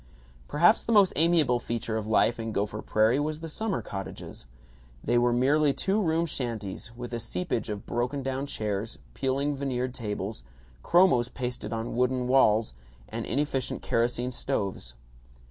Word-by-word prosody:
Perhaps 175 +9 +4
the - - -2
most 205 -4 +5
amiable 155 -6 +3
feature 115 -1 -3
of 110 -1 -2
life 115 +2 +3
in 115 0 -3
Gopher 105 +1 -2
Prairie 110 +5 +2
was 155 +1 -2
the 165 - -6
summer 205 +5 -2
cottages. 95 -9 -7 0.6
They 120 0 +3
were 120 0 +3
merely 140 +4 +3
two 195 +7 +1
room 165 -2 +1
shanties, 115 - -4
with 120 0 -6
a 120 - -1
seepage 130 0 -3
of 105 -1 -5
broken 125 +4 -2
down 135 +1 -2
chairs, 105 -3 -3 0.2
peeling 140 - 0
veneered 130 -2 -2
tables, 105 - -4 0.4
chromos 170 -10 +4
pasted 125 -4 -4
on 115 0 -3
wooden 125 0 +1
walls, 115 - +4 0.4
and - - -4
inefficient 135 0 -1
kerosene 120 +2 0
stoves. 100 - -3
125 Hz, 150 wpm, -28 LUFS, 115-145 Hz, 0.6 s, most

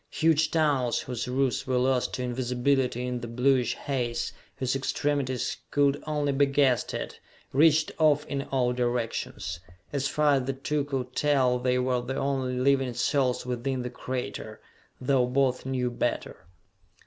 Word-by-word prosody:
Huge 160 -1 +2
tunnels, 145 -7 +1
whose 125 -1 -4
roofs 130 0 0
were 130 -1 +1
lost 125 0 +1
to 125 - -3
invisibility 125 0 0
in 125 -1 -2
the 120 - -6
bluish 125 +2 +2
haze, 120 -4 -2 0.2
whose 130 0 -1
extremities 135 -1 -1
could 145 0 +2
only 150 -2 0
be 140 +1 +3
guessed 135 -3 +2
at, - - -5 0.3
reached 155 +2 +4
off 150 -1 +4
in 140 -1 -2
all 125 -2 +2
directions. 120 -8 -2 0.3
As 140 -1 0
far 150 0 +3
as 130 - -2
the 135 - -1
two 140 +2 -2
could 130 -3 -4
tell 130 -4 +2
they 125 0 +1
were 125 -1 +1
the 130 +2 -4
only 135 -2 -1
living 135 -1 +2
souls 125 +1 +1
within 125 +1 -2
the 125 - -5
crater, 125 0 -5 0.4
though 130 -1 +2
both 130 0 +1
knew 125 -2 -1
better. 120 - -3
130 Hz, 155 wpm, -27 LUFS, 125-140 Hz, 0.4 s, reached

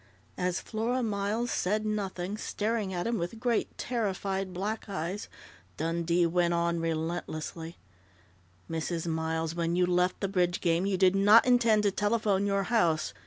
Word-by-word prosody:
As 180 0 0
Flora 235 +3 -2
Miles 215 +2 -1
said 210 +4 0
nothing, 200 -2 -2
staring 215 -1 -2
at 175 -1 -2
him 230 -2 0
with 175 +6 -4
great, 240 -1 -1
terrified 195 -5 -2
black 205 +4 -4
eyes, 190 +1 -4 0.5
Dundee 170 +2 +1
went 170 0 +2
on 170 0 0
relentlessly: 165 0 -4 0.9
"Mrs. 165 +1 -3
Miles, 160 0 -1
when 170 0 -1
you 180 0 +3
left 180 0 +1
the 195 - -1
bridge 180 -2 +1
game, 170 +2 +1
you 195 -2 0
did 185 0 +4
not 205 +3 +6
intend 235 -4 +4
to 205 - +3
telephone 205 -1 +1
your 200 0 +1
house. 175 -7 +1
190 Hz, 150 wpm, -29 LUFS, 170-210 Hz, 0.9 s, not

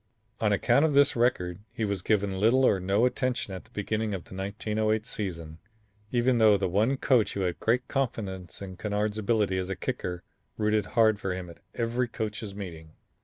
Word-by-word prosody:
On 105 -2 +2
account 120 +7 +3
of 155 -3 +2
this 140 0 +5
record, 95 -7 +1
he 110 - -2
was 100 -3 -2
given 100 -2 0
little 125 +6 +4
or 95 - +4
no 100 +5 +2
attention 125 -5 -1
at 95 - -7
the - - -22
beginning 105 0 -2
of 90 - -6
the - - -14
1908 110 +3 -1
season, 85 -8 -5 0.5
even 120 0 +2
though 110 -2 +6
the 95 -1 0
one 110 +9 +2
coach 125 -5 +2
who 100 - -1
had 90 -2 -1
great 125 +3 +1
confidence 100 -9 -3
in 95 -2 -8
Kennard's 105 +1 -1
ability 105 -3 +1
as 90 0 -3
a 95 - -2
kicker 90 +1 -4 0.3
rooted 105 -2 +1
hard 110 -2 +5
for 95 -3 -2
him 90 -2 -6
at - - -16 0.2
every 120 +2 0
coaches' 105 -3 -5
meeting. 80 -5 -8
105 Hz, 190 wpm, -28 LUFS, 95-115 Hz, 0.5 s, though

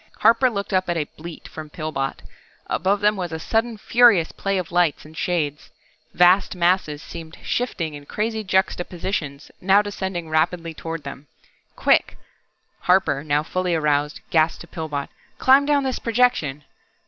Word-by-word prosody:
Harper 235 +3 +5
looked 200 -4 -4
up 185 -1 +1
at 170 - 0
a 155 - +1
bleat 165 +1 -9
from 155 -1 -9
Pillbot. 150 -3 -4 0.4
Above 195 +3 0
them 210 +1 +3
was 180 -3 -4
a 160 - -3
sudden 225 +7 -1
furious 220 -6 +4
play 195 0 -2
of 180 -3 -4
lights 175 -4 +1
and 155 +1 -14
shades. 150 -3 -2 0.5
Vast 180 +3 +4
masses 175 -4 +1
seemed 160 0 -9
shifting 175 -10 -2
in 145 -1 -10
crazy 220 +1 -2
juxtapositions, 175 -6 -2
now 195 +2 +4
descending 190 -4 -4
rapidly 165 +1 0
toward 165 -1 -6
them. 140 +1 -9 0.5
"Quick," - - +2 0.6
Harper, 180 -6 +2
now 150 0 +1
fully 180 +1 -1
aroused, 150 -1 0
gasped 160 0 +2
to 170 - -11
Pillbot. 150 -4 -4 0.3
"Climb 275 +2 +5
down 290 -1 +3
this 260 -1 -2
projection!" 225 - +1
175 Hz, 150 wpm, -22 LUFS, 155-200 Hz, 0.6 s, Harper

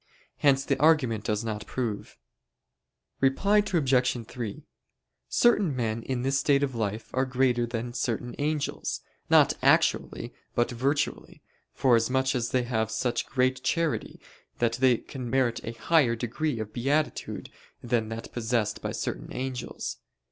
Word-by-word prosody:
Hence 135 -2 +3
the - - 0
argument 130 -9 +3
does 105 0 0
not 110 -2 -4
prove. 115 - -4 1.0
Reply 195 +11 +3
Obj. 130 - +1
3: 115 -5 -6 0.7
Certain 205 - +3
men 115 -2 -1
in 125 +1 -3
this 135 +1 +2
state 140 0 +3
of 135 -2 -1
life 110 -1 -3
are 130 - +2
greater 125 -2 +1
than 120 +1 -4
certain 120 0 -2
angels, 150 0 -2 0.3
not - - +6
actually, - - +2 0.2
but 120 +1 +2
virtually; 135 +5 -2 0.3
forasmuch 130 +1 +3
as 120 -2 -1
they 130 -1 +1
have 110 -3 -1
such 120 +2 -1
great 130 0 +1
charity 165 +3 -1 0.4
that 115 -1 +1
they 130 -3 +5
can 130 -1 -7
merit 130 -2 +1
a 115 - -5
higher 125 0 +3
degree 120 +3 -2
of 105 -1 -5
beatitude 145 +5 -1 0.3
than 115 -2 0
that 115 0 -6
possessed 115 -2 -1
by - - -3
certain - - -4
angels. 130 -1 -4
125 Hz, 140 wpm, -27 LUFS, 115-135 Hz, 1.0 s, not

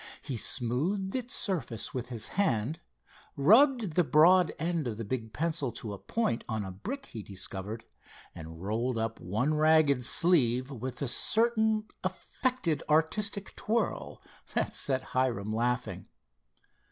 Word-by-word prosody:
He 135 - -4
smoothed 155 - +1
its 255 0 0
surface 140 - -1
with 125 -1 -4
his 115 -3 -4
hand, 155 - 0 0.6
rubbed 225 - +4
the 180 - +3
broad 165 +5 +5
end 165 -3 -2
of 110 -3 -4
the 115 - -5
big 110 0 -4
pencil 150 +1 -1
to 110 -2 -4
a 100 - -8
point 225 - -2
on 110 -3 -2
a 95 - -6
brick 245 - -6
he 110 - -8
discovered, 100 +2 -5 0.5
and 80 +1 -10
rolled 115 +4 -1
up 115 0 -3
one 110 - -1
ragged 155 -4 +3
sleeve 130 -4 +3
with 130 +2 -5
a - - -1
certain 220 - +2 0.2
affected, 185 - -2
artistic 195 +6 +1
twirl 230 +2 -2 0.3
that - - 0
set 130 -2 +1
Hiram 115 -5 0
laughing. 125 +2 -2
135 Hz, 140 wpm, -29 LUFS, 115-185 Hz, 0.6 s, broad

